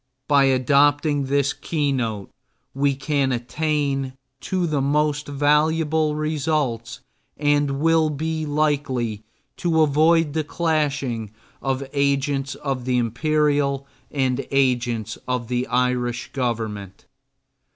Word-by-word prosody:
By 140 -2 +5
adopting 140 +2 +3
this 140 +1 +1
keynote 130 - -2 0.4
we 140 0 +1
can 135 -1 0
attain 135 +1 -1 0.3
to 185 -2 -1
the 150 -4 0
most 150 +1 +1
valuable 150 +2 +2
results 150 -6 -1 0.4
and 145 -1 +1
will 160 0 +3
be 160 +2 -2
likely 140 -7 0 0.4
to 165 -2 +2
avoid 155 +1 +3
the 160 0 0
clashing 145 - -1 0.3
of 135 0 -2
agents 140 -1 0
of 135 -3 -4
the 125 -1 +1
Imperial 140 +3 +1 0.2
and 130 -2 0
agents 120 -5 0
of 125 -2 -2
the 125 0 -1
Irish 125 0 0
Government. 110 -6 -3
140 Hz, 105 wpm, -22 LUFS, 125-150 Hz, 0.4 s, By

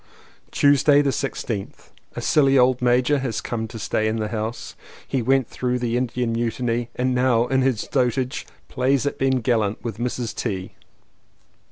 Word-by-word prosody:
Tuesday 145 +1 +4
the 140 - +1
16th. 115 -7 -4 0.2
A - - -4
silly 135 -3 +3
old 125 0 +3
major 125 +3 +3
has 120 -5 -2
come 110 0 -4
to 115 +1 -9
stay 110 0 -1
in 110 - 0
the 110 -1 -2
house. 110 +1 -4 0.3
He 135 - -1
went 130 +1 +2
through 125 0 -2
the 120 -1 -1
Indian 125 -1 -1
Mu 115 0 0
tiny 120 0 -2
and 130 +1 0
now 125 -2 +3
in 130 +1 +1
his 130 -4 +1
dotage 125 +1 -1 0.2
plays 135 +2 +1
at 145 - -2
being 130 -1 +1
gallant 110 -3 0
with 115 -3 -5
Mrs. 120 -1 -3
T. 95 -2 -3
125 Hz, 170 wpm, -23 LUFS, 115-130 Hz, 0.3 s, Tuesday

